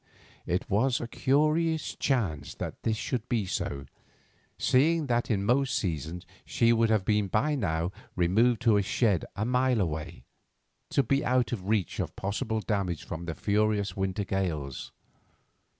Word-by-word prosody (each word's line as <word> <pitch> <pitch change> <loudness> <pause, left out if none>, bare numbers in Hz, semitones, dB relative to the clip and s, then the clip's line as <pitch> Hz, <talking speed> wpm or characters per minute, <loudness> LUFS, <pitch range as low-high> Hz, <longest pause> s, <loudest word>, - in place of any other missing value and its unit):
It 90 +1 -1
was 120 +5 +2
a 120 - -4
curious 155 +5 +1
chance 95 - -1
that - - -6
this 110 -1 0
should 125 0 -3
be 115 -5 +1
so, 70 -6 -3 0.7
seeing 155 +5 +3
that 120 -2 0
in 100 -4 +1
most 130 +3 +2
seasons 85 0 -3 0.2
she 115 0 +3
would 115 -1 +3
have 110 -4 +2
been 105 -1 +2
by 110 +11 +1
now 85 - -1 0.2
removed 110 +8 +2
to 115 -3 +5
the 105 - +4
shed 115 -3 +1
a 110 - -1
mile 125 0 +2
away, 80 -2 -3 0.7
to 140 - +2
be 135 +4 +1
out 125 -1 +1
of 100 -5 -4
reach 105 -7 0
of - - -3
possible 110 +3 -2
damage 100 -6 -2
from 85 0 -6
the 85 -2 -4
furious 105 -2 +1
winter 95 +1 -1
gales. 80 -9 -3
110 Hz, 155 wpm, -28 LUFS, 90-125 Hz, 0.7 s, to